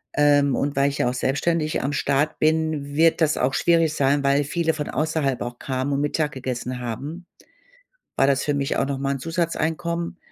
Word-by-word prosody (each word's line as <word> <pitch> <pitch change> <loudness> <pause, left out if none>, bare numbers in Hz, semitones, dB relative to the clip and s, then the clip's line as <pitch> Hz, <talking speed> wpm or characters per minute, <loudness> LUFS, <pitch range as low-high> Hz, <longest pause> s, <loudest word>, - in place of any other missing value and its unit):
Ähm, 145 -2 +4
und 145 +3 -1
weil 140 +1 +3
ich 140 - -5
ja 125 - +2
auch - - -2
selbstständig 155 +5 0
am 140 +2 -1
Start 145 +2 0
bin, 155 -2 0
wird 165 +2 +3
das 155 -1 +2
auch 130 +2 +1
schwierig 165 -2 +2
sein, 140 0 +1
weil 140 +1 +3
viele 160 +3 0
von 150 -2 -4
außerhalb 150 -2 -1
auch 120 0 -5
kamen 130 +1 -2
und 140 - 0
Mittag 150 0 0
gegessen 130 -1 -4
haben, 140 +9 -6 0.9
war 135 - +3
das 140 -1 +2
für 145 - 0
mich 140 -1 -1
auch - - +1
noch 140 0 -3
mal 135 0 -1
'n - - -6
Zusatzeinkommen. 170 +2 -2
145 Hz, 200 wpm, -23 LUFS, 135-160 Hz, 0.9 s, Ähm